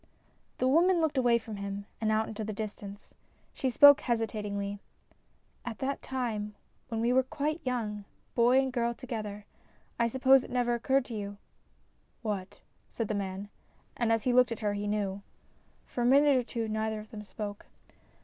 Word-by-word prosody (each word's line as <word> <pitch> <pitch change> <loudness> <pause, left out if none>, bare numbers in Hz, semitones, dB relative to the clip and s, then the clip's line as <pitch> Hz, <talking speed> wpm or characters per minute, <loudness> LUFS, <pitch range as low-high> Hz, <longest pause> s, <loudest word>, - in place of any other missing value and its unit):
The 255 - +1
woman 340 +6 +4
looked 310 -4 +1
away 240 -2 +4
from 225 -2 -7
him 200 0 -5 0.2
and 220 -1 +2
out 220 0 +2
into 220 0 -5
the 215 0 -4
distance. 205 -1 -7 0.4
She 265 - -1
spoke 285 +3 +8
hesitatingly. 210 -3 -2 0.8
"At 240 -2 -5
that 275 +1 -2
time, 220 -5 -3 0.3
when 225 -2 -2
we 240 +2 +2
were 260 - +5
quite 300 +4 -3
young, 215 -5 -2 0.3
boy 240 +2 +4
and 265 -1 +2
girl 235 -1 0
together, 215 -5 -6 0.5
I 235 - +4
suppose 265 +2 +5
it - - -10
never 245 -1 +1
occurred 265 +2 +1
to 240 - -8
you 205 -2 -5 0.3
" - - -39
" - - -40
What? 205 -4 -4
" - - -40
said 225 -3 -3
the - - 0
man. 200 0 -4 0.5
And 235 -2 +1
as 225 -1 +2
he 250 - +2
looked 250 -1 +5
at 230 - -4
her 205 - +2
he 205 0 -3
knew. 200 -2 -1 0.6
For 245 - -4
a - - +2
minute 280 +2 +6
or 255 - +2
two 230 -1 -3
neither 220 0 -1
of 215 - -11
them 215 - -7
spoke. 205 -1 -7
225 Hz, 190 wpm, -30 LUFS, 210-255 Hz, 0.8 s, spoke